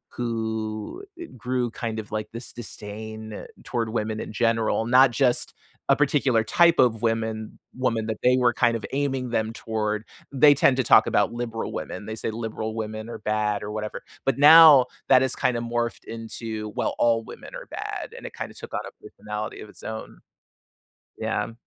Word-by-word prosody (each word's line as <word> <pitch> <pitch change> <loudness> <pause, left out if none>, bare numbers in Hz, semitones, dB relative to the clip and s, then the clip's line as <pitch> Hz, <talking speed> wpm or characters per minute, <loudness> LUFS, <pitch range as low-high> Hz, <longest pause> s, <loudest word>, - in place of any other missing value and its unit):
who 110 - -3
g 345 -1 -7
grew, 125 0 -1
kind 115 -1 -4
of, 105 - -8
like, 110 0 -3
dis 115 +1 -7
disdain 110 -1 -8 0.2
toward 115 -3 -2
women 110 -1 -2
in - - -6
general, 115 +1 +1
not 130 +3 +6
just 125 0 +1 0.4
a 140 - +6
particular 135 -5 +2
type 170 +8 +4
of 115 -3 +3
women 110 -1 -2 0.2
woman 115 -4 0
that 110 -1 -2
they 125 +1 +5
were 125 -1 +3
kind 115 +1 +2
of 110 - -8
aiming 135 -2 -1
them 110 -1 -1
toward. 110 -2 -2 0.3
They 145 +2 +6
tend 140 -1 +4
to 130 - +2
talk - - +6
about - - +2
liberal 120 -1 -4
women. - - -5
They 110 - -4
say 115 - -3
liberal 110 -1 -4
women 110 0 -5
are - - -7
bad 105 -1 -1
or 105 - -5
whatever. 105 0 -5 0.2
But 135 - +1
now 150 -2 +9 0.2
that 130 -1 +7
has 130 -2 0
kinda 120 -2 0
morphed 120 0 -2
into, 115 -1 -6
"Well, - - -1
all 115 -1 +3
women - - -11
are - - -8
bad," - - -6
and - - -10
it - - -7
kinda - - -6
took - - -11
on - - -1
a - - -10
personality 105 0 -6
of 105 - -10
its - - -17
own. 110 0 -7 1.0
Yeah. 115 - -2
115 Hz, 185 wpm, -25 LUFS, 110-125 Hz, 1.0 s, now